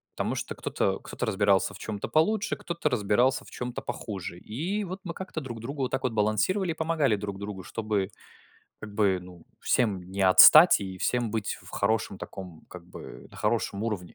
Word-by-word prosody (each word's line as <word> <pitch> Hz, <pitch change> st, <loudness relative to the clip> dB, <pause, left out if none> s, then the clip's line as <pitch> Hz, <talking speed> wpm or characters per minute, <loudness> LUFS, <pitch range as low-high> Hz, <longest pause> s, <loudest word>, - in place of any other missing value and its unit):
Потому -, -, -2 dB
что -, -, -4 dB
кто-то -, -, -1 dB
кто-то -, -, -5 dB
разбирался 100 Hz, 0 st, +2 dB
в -, -, -10 dB
чём-то 105 Hz, -2 st, -5 dB
получше, 210 Hz, +7 st, +1 dB
кто-то 170 Hz, -3 st, -2 dB
разбирался 125 Hz, +3 st, +1 dB
в -, -, -14 dB
чём-то 125 Hz, -1 st, -5 dB
похуже. 95 Hz, -4 st, -6 dB
И 175 Hz, -, -3 dB
вот 185 Hz, +1 st, -6 dB
мы 170 Hz, -, -4 dB
как-то 185 Hz, -3 st, -6 dB
друг 120 Hz, -6 st, -7 dB
другу 135 Hz, +3 st, -4 dB
вот 125 Hz, -, -2 dB
так 130 Hz, -, -2 dB
вот 130 Hz, -, 0 dB
балансировали 110 Hz, -, +1 dB
и -, -, -2 dB
помогали 160 Hz, -8 st, +1 dB
друг 100 Hz, -1 st, -6 dB
другу, 100 Hz, -2 st, -6 dB
чтобы 105 Hz, -3 st, -2 dB, 0.7 s
как 105 Hz, -1 st, -9 dB
бы, 100 Hz, -4 st, +2 dB
ну, 90 Hz, -2 st, -14 dB, 0.2 s
всем 105 Hz, -6 st, +1 dB
не 100 Hz, 0 st, -2 dB
отстать 150 Hz, -, +9 dB
и 95 Hz, -1 st, -6 dB
всем 120 Hz, +3 st, 0 dB
быть 110 Hz, -2 st, -3 dB
в -, -, -14 dB
хорошем 105 Hz, -1 st, 0 dB
таком, 90 Hz, -5 st, -9 dB
как 90 Hz, -2 st, -10 dB
бы, 90 Hz, -, -11 dB
на -, -, -15 dB
хорошем 100 Hz, +2 st, -1 dB
уровне. 100 Hz, -6 st, -4 dB
110 Hz, 190 wpm, -27 LUFS, 100-140 Hz, 0.7 s, отстать